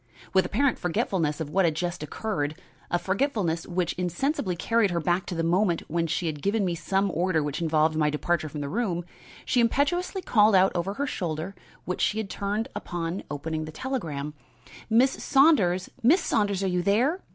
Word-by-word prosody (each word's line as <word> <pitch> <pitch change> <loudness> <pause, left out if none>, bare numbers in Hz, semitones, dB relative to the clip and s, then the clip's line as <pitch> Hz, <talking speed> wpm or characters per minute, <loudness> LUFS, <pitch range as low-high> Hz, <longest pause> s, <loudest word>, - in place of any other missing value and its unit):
With 190 -2 +4
apparent 255 +6 +1
forgetfulness 175 -5 0
of 155 -2 -4
what 195 +3 +3
had 165 -3 +2
just 175 0 -3
occurred 150 -2 -3 0.3
a 175 - +2
forgetfulness 190 - -1
which 175 -1 -1
insensibly 180 - -1
carried 225 +4 +2
her 175 -1 -1
back 175 +3 0
to 175 - -4
the 165 - -1
moment 175 +1 +2
when 165 +1 0
she 165 +2 -1
had 150 -3 -3
given 200 +3 +1
me 175 - 0
some 195 +3 0
order 170 -2 +1
which 145 +3 -3
involved 155 -1 +2
my 150 -1 +2
departure 155 +1 -1
from 150 0 -6
the 140 - -3
room 175 -2 -1 0.4
she 250 - +2
impetuously 350 - +1
called 210 -2 +4
out 190 +1 +5
over 185 +3 -2
her 280 - -1
shoulder 170 - -3 0.3
which 180 - -3
she 215 - +1
had 220 -3 -3
turned 205 +3 -2 0.3
on 170 +2 -2
opening 155 +2 -3
her 155 - -7
telegram: 155 - -4 0.6
"Miss 245 +4 +5
Saunders! 210 - +4
Miss 285 +11 +5
Saunders! 200 - 0
are - - +1
you 180 -1 +1
there? 245 - +2
180 Hz, 185 wpm, -26 LUFS, 165-215 Hz, 0.6 s, out